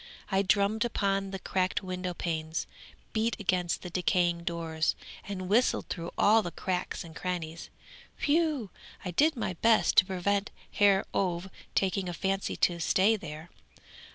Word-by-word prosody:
I 195 0 +3
drummed 200 +3 +2
upon 195 -4 0
the 195 - -4
cracked 185 +1 -1
window 185 -1 -4
panes, 160 -2 -2 0.5
beat 225 +1 0
against 180 -3 0
the 180 - -6
decaying 175 -1 +1
doors, 165 -2 -1 0.3
and 185 -2 -4
whistled 230 +6 +2
through 170 -1 -4
all 220 +2 +5
the 175 - -4
cracks 180 +1 -3
and 165 -1 -12
crannies, 170 -3 -4 0.5
whew! 300 - +1 0.3
I 180 - -2
did 300 - +3
my 225 -6 -2
best 230 -1 +4
to 185 - +8
prevent 200 +2 0 0.2
Herr 200 -1 +4
Ové 185 0 -1 0.2
taking 190 -1 +1
a - - -4
fancy 195 +1 -1
to 175 -1 +1
stay 195 +6 +3
there. 160 -3 -8
185 Hz, 150 wpm, -29 LUFS, 175-205 Hz, 0.5 s, to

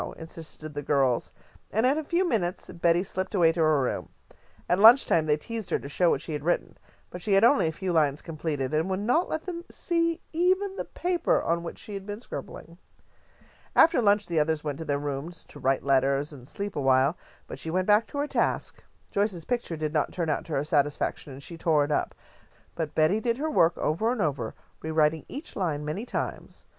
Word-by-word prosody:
insisted 160 -1 -9
the 145 - -4
girls, 135 -4 +1 0.4
and 220 +4 +1
in 265 +3 +4
a 315 - -2
few 350 +5 +1
minutes 185 - -1
Betty 170 +1 +2
slipped 190 +1 -4
away 170 -4 +5
to 165 - -5
her 155 -3 +4
room. - - -3 0.6
At 180 - +2
lunch 230 +6 +8
time 160 -2 +2
they 150 0 +3
teased 225 +5 -6
her - - +2
to - - -8
show 160 +5 0
them - - +6
what 140 - -3
she 165 - -5
had 145 -1 -4
written, 175 +2 0 0.4
but 180 - -7
she 200 - 0
had 195 +2 +5
only 235 - +5
a - - 0
few 180 +2 -3
lines 150 -3 +2
completed, 155 -4 -3
and 160 +4 +1
would 190 0 -1
not 250 - +1
let 315 +1 -2
them 345 -2 -5
see 335 -1 0
even 375 +4 +1
the - - -4
paper 350 -1 0
on 170 +1 0
which 170 - -7
she 210 - -10
had 195 0 -6
been 205 +1 -5
scribbling. 170 -7 -9 1.0
After 325 - +6
lunch 205 -1 +3
the 170 -2 0
others 155 0 0
went 145 -1 -4
to 160 - -5
their 145 -2 0
rooms 145 +4 -5
to - - -12
write 135 0 +1
letters 140 +2 +2
and 130 -3 -12
sleep 200 +5 -5
awhile, 135 +2 +3 0.3
but - - -9
she 160 - -6
went 185 +3 0
back 210 +2 +4
to 285 - -8
her 290 +1 0
task. - - -1 0.3
Joyce's 200 -5 -1
picture 235 -9 -2
did 155 0 -3
not 150 - +1
turn 165 -3 -1
out - - -2
to 160 - -6
her 135 - +1
satisfaction, 145 -1 0
and 135 +1 -10
she 165 +1 -9
tore 155 -3 +3
it 150 - -5
up, 145 - 0 0.6
but 155 -3 -4
Betty 160 +7 +3
did 235 +1 0
her 310 +3 -2
work 170 - +3
over 215 +10 0
and 250 - -2
over, 135 - -1 0.3
rewriting 155 0 +1
each 290 +4 -8
line 155 -6 -2
many 190 +11 -4
times. - - -5
165 Hz, 220 wpm, -27 LUFS, 150-215 Hz, 1.0 s, lunch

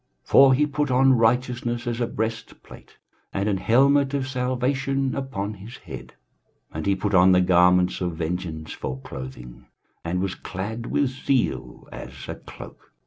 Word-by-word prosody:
23:059:017 - - -31
For 135 -1 +8
he 150 +3 +3
put 150 0 -1
on 130 +1 +5
righteousness 120 +1 0
as 120 0 -2
a 120 - +1
breastplate, 110 +1 -6 0.3
and 100 +1 -1
an 100 -2 +1
helmet 140 +6 +3
of 135 -2 -1
salvation 130 +1 -1
upon 115 -7 -4
his 105 +5 -11
head; 65 -1 -10 0.6
and 80 +4 -4
he 100 - +3
put 100 +1 -2
on 95 0 +6
the 90 - +5
garments 90 0 +4
of 90 -2 -2
vengeance 80 -1 -4
for 65 0 -5
clothing, 65 -3 -9 0.4
and 85 +2 -2
was 95 0 -1
clad 110 +5 -6
with 145 - +1
zeal 130 - -2
as - - -9
a - - -4
cloak. - - -13
110 Hz, 160 wpm, -24 LUFS, 90-130 Hz, 0.6 s, For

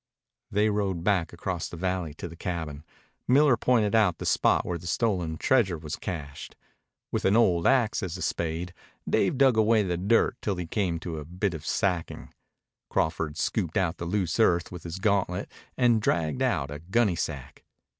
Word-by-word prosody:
They 105 +2 +2
rode 95 -5 -1
back 95 -4 +1
across 85 0 -4
the 85 - -8
valley 90 -3 -2
to 85 - -6
the 85 - -11
cabin. 80 -5 -5 0.4
Miller 140 +1 +5
pointed 115 -3 +2
out 105 -7 +3
the - - -6
spot - - +2
where 85 -1 -3
the 85 - -9
stolen 90 -5 0
treasure 105 -8 +2
was 75 0 -5
cached. 75 -6 -7 0.6
With - - -1
an 95 +3 +4
old 90 -7 +3
axe 125 -5 +2
as 90 -2 -4
a 90 - -5
spade 85 +2 -2 0.3
Dave 95 +6 +1
dug 135 -4 +4
away 110 0 +4
the 90 -3 -1
dirt 105 +6 +2
till 100 - -1
he 90 -1 -4
came 85 -2 -1
to 80 -3 -5
a - - -6
bit 90 +4 -2
of 80 -2 -7
sacking. 90 -4 -2 0.6
Crawford 80 -1 -1
scooped 90 +1 -1
out 90 -2 0
the 85 - -5
loose 90 0 -1
earth 85 -6 +3
with 90 -2 -9
his 85 +1 -5
gauntlet 100 -2 0 0.3
and 120 -3 +3
dragged 85 +5 0
out 80 - 0
a 75 - -6
gunnysack. 85 - -1
90 Hz, 180 wpm, -27 LUFS, 85-105 Hz, 0.6 s, Miller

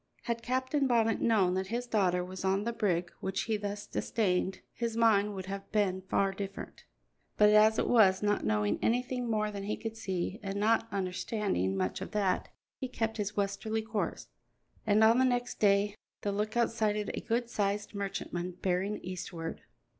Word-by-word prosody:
Had 235 -1 -2
Captain 260 +3 0
Bonnet 225 -3 +2
known 200 -6 +3
that 190 0 -1
his 240 +4 -2
daughter 185 -6 +1
was 185 +1 -7
on 195 +1 +1
the 235 +2 -2
brig 175 -6 0
which 190 - -2
he 220 - 0
thus 205 0 -4
disdained, 190 -3 -1
his 230 -1 -3
mind 210 -3 +3
would 190 -1 -5
have 195 +1 -6
been 195 -3 +1
far 195 +1 +1
different; 195 0 -7 0.5
but 210 0 +6
as 215 +1 +6
it - - +1
was, 205 -5 +5
not 205 0 +1
knowing 105 -1 +1
anything 245 +1 0
more 215 -1 0
than 200 -1 -5
he 210 - -2
could 225 -1 -5
see, 190 -1 -3
and 200 -1 -3
not 225 +2 +3
understanding 185 - -1
much 95 -1 -1
of - - -6
that, 195 -3 0 0.3
he 260 - -3
kept 225 -2 -2
his 210 0 -3
westerly 205 +2 -1
course, 220 -1 -3 0.6
and 215 +1 +5
on 225 +3 +6
the - - +5
next 245 -1 0
day 200 0 +3 0.3
the 205 - -1
lookout 215 +4 0
sighted 210 -2 0
a - - -4
good 235 +1 -1
sized 205 -2 -1
merchantman 180 -3 -3
bearing 190 +3 0
eastward. 175 -2 -5
205 Hz, 175 wpm, -31 LUFS, 190-225 Hz, 0.6 s, but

